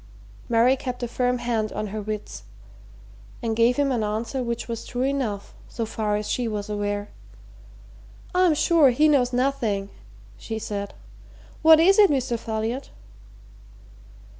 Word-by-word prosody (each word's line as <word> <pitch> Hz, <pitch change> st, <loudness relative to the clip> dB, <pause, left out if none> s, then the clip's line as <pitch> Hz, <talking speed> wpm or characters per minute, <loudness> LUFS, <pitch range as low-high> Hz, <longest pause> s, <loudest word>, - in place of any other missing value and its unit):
Mary 240 Hz, +3 st, +4 dB
kept 250 Hz, -2 st, -5 dB
a -, -, -1 dB
firm 250 Hz, +1 st, 0 dB
hand 230 Hz, -3 st, -1 dB
on 215 Hz, -, -3 dB
her 215 Hz, -, -3 dB
wits 210 Hz, -, -6 dB, 1.0 s
and 225 Hz, -1 st, -1 dB
gave 230 Hz, +2 st, +3 dB
him 285 Hz, -1 st, +2 dB
an 240 Hz, -3 st, 0 dB
answer 220 Hz, +5 st, -2 dB
which 235 Hz, -1 st, -3 dB
was 230 Hz, -1 st, -5 dB
true 245 Hz, 0 st, -3 dB
enough, 260 Hz, -7 st, -2 dB, 0.2 s
so 230 Hz, -, -3 dB
far 215 Hz, -1 st, -2 dB
as 210 Hz, 0 st, -3 dB
she 245 Hz, -2 st, -1 dB
was 210 Hz, -1 st, -4 dB
aware. 205 Hz, 0 st, -2 dB, 1.2 s
"I'm 360 Hz, -3 st, +4 dB
sure 320 Hz, -2 st, +4 dB
he 295 Hz, +5 st, +3 dB
knows 265 Hz, -5 st, +3 dB
nothing," 240 Hz, -6 st, -1 dB, 0.5 s
she 220 Hz, -, -5 dB
said. 200 Hz, -2 st, -5 dB, 0.7 s
"What 320 Hz, 0 st, +8 dB
is 385 Hz, +5 st, +5 dB
it, 405 Hz, -2 st, +7 dB
Mr. 255 Hz, -4 st, 0 dB
Folliot?" 225 Hz, +4 st, -3 dB
235 Hz, 145 wpm, -24 LUFS, 215-265 Hz, 1.2 s, What